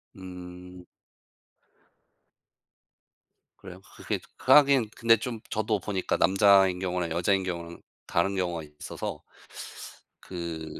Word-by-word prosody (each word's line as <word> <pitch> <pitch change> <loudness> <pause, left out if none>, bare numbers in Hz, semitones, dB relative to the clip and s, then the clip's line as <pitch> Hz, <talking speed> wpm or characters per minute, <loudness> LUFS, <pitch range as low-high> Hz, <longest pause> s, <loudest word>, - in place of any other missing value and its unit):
음. 90 -1 -10 2.7
그래요. 95 -1 -11
그 - - -13
그게 - - -1 0.2
하긴 135 -3 +5
근데 115 0 +4
좀 115 +1 -5
저도 110 -1 0
보니까 95 0 -2
남자인 95 -1 +5
경우랑 90 -2 -2
여자인 95 +3 +1
경우랑 85 -2 -6 0.3
다른 95 +4 +1
경우가 90 -3 -1 0.2
있어서 - - -6 1.0
그 80 -3 -6
95 Hz, 210 characters per minute, -27 LUFS, 90-100 Hz, 2.7 s, 하긴